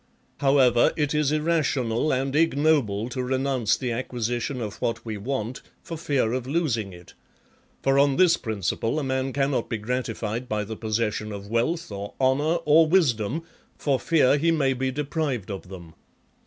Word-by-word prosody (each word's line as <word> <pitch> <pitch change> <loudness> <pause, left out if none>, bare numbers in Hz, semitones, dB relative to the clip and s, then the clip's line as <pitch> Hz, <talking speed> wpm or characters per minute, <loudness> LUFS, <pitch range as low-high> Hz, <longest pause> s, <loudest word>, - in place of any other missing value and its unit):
VII. 140 - -1
However, 130 -4 +5
it 150 -1 0
is 150 -2 +1
irrational 150 -5 +1
and 135 +1 -1
ignoble 145 -9 +2
to 130 +1 -3
renounce 130 -3 0
the 125 -2 -3
acquisition 120 +2 -2
of 105 -3 -6
what 115 - -2
we 110 -1 -4
want 120 +2 -4 0.2
for 165 - -6
fear 140 -7 0
of 130 -1 -3
losing 130 - -1
it; 90 -1 -14 0.7
for 135 0 +3
on 140 -1 +4
this 180 0 +5
principle 110 - -2
a 155 - -1
man 130 0 -1
cannot 135 -3 0
be 115 - -1
grati 120 +1 -3
fied 115 +3 -4
by 105 -1 -1
the 110 +2 -6
possession 110 -1 -2
of 100 0 -8
wealth, 140 +6 0
or 100 0 -6
honour, 140 +5 +2
or 160 +2 +6
wisdom, 155 - +1 0.3
for 140 -3 0
fear 145 -3 +3
he 165 +3 +2
may 145 -5 +2
be 130 +1 -1
deprived 140 - -2
of 95 -2 -7
them. 85 -4 -10
130 Hz, 170 wpm, -25 LUFS, 110-145 Hz, 0.7 s, or